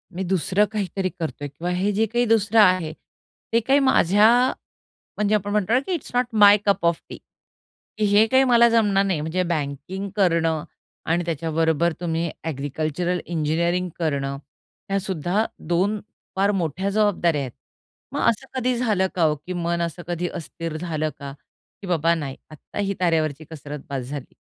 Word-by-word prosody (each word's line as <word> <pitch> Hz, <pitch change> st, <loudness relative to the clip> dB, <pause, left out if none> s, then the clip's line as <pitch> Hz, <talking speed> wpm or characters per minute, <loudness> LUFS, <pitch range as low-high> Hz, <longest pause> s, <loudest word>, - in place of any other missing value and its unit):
मी 190 Hz, -, -2 dB
दुसरं 190 Hz, +3 st, +2 dB
काहीतरी 195 Hz, -3 st, -2 dB
करत 160 Hz, -3 st, -4 dB
आहे 145 Hz, -, -3 dB
किंवा 165 Hz, +6 st, -5 dB
हे 190 Hz, +3 st, 0 dB
जे 225 Hz, -, +4 dB
काही 240 Hz, +3 st, 0 dB
दुसरं 225 Hz, 0 st, +3 dB
आहे 185 Hz, -5 st, +3 dB, 0.6 s
ते 230 Hz, -, +5 dB
काही 270 Hz, +5 st, +3 dB
माझ्या 205 Hz, -7 st, +4 dB, 0.9 s
म्हणजे 210 Hz, 0 st, +2 dB
आपण 205 Hz, -1 st, -2 dB
म्हणतो 210 Hz, +4 st, +2 dB
की 375 Hz, -, -1 dB
it's 330 Hz, -, -5 dB
not 250 Hz, +1 st, +3 dB, 0.2 s
my 205 Hz, 0 st, +9 dB
cup 200 Hz, -3 st, +2 dB
of 170 Hz, -1 st, +2 dB
T -, -, -7 dB, 0.8 s
की 215 Hz, -, +1 dB
हे 210 Hz, +2 st, +6 dB
काही 260 Hz, +3 st, +4 dB
मला 235 Hz, 0 st, +6 dB
जमणार 205 Hz, -4 st, +3 dB
नाही 185 Hz, -6 st, 0 dB
म्हणजे 165 Hz, +4 st, -1 dB
बँकिंग 160 Hz, +5 st, -3 dB
करणं 165 Hz, -5 st, +2 dB, 0.4 s
आणि 170 Hz, +2 st, +1 dB
त्याच्याबरोबर 165 Hz, +1 st, 0 dB
तुम्ही 170 Hz, -1 st, -1 dB, 0.2 s
एग्रीकल्चरल 155 Hz, +4 st, -2 dB
इंजिनिअरिंग 170 Hz, +3 st, 0 dB
करणं, 140 Hz, -4 st, -1 dB, 0.5 s
ह्या 195 Hz, 0 st, +1 dB
सुद्धा 190 Hz, +2 st, -1 dB, 0.2 s
दोन 190 Hz, +5 st, +1 dB, 0.4 s
फार 195 Hz, +2 st, +2 dB
मोठ्या 185 Hz, 0 st, -1 dB
जबाबदाऱ्या 195 Hz, -7 st, +1 dB
आहेत. 130 Hz, -3 st, -5 dB, 0.6 s
मग -, -, -2 dB
असं 235 Hz, +4 st, -2 dB
कधी 250 Hz, 0 st, +1 dB
झालं 210 Hz, -6 st, +1 dB
का 175 Hz, -, +1 dB
हो 155 Hz, -1 st, +3 dB
की 185 Hz, -, -3 dB
मन 170 Hz, -1 st, -1 dB
असं 170 Hz, +1 st, -4 dB
कधी 175 Hz, 0 st, -2 dB
हो -, -, -8 dB
अस्थिर 165 Hz, 0 st, -6 dB
झालं 155 Hz, -2 st, -2 dB
का 140 Hz, -1 st, -7 dB, 0.5 s
की 195 Hz, -, -8 dB
बाबा 170 Hz, -1 st, +2 dB
नाही 140 Hz, -5 st, -5 dB
आत्ता 155 Hz, +5 st, -10 dB
ही 200 Hz, -1 st, 0 dB
तारेवरची 160 Hz, -4 st, 0 dB
कसरत 150 Hz, -2 st, -7 dB
बस 135 Hz, -2 st, -2 dB
झाली? 145 Hz, -2 st, -7 dB
175 Hz, 170 wpm, -23 LUFS, 160-205 Hz, 0.9 s, my